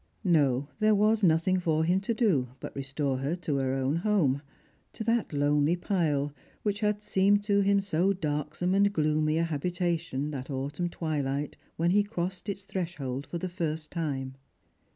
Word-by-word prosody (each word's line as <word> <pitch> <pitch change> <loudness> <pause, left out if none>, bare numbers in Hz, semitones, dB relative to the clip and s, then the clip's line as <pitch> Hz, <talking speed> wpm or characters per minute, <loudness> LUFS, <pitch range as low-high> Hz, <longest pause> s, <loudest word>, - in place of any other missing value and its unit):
No, 145 - +3
there 215 0 +4
was 215 +2 +3
nothing 180 +1 +3
for 160 -3 +1
him 180 +3 +2
to 215 +4 -2
do 180 - +2
but - - -7
restore 135 -1 -2
her 140 +5 -1
to 160 -5 -2
her 135 -1 0
own 135 +3 0
home 170 -8 +2 0.3
— - - -38
to 220 - -5
that 230 0 +1
lonely 145 +2 +2
pile 155 -6 0 0.3
which 205 -1 0
had 210 -1 0
seemed 205 +1 +3
to 200 -1 +2
him 200 0 +3
so 195 0 +1
darksome 155 0 -1
and 200 +1 +4
gloomy 155 -2 +1
a 165 - +2
habi 165 +2 -2
tation 165 -5 -1
that 135 -2 -6
autumn 145 +6 -2
twilight 145 -4 -2 0.2
when 170 +2 +2
he 205 +2 +5
crossed 190 -1 -4
its 200 0 -4
threshold 160 -9 -4
for 175 - -4
the 185 - -3
first 160 -3 -3
time. 135 -6 -3
165 Hz, 175 wpm, -29 LUFS, 145-195 Hz, 0.3 s, he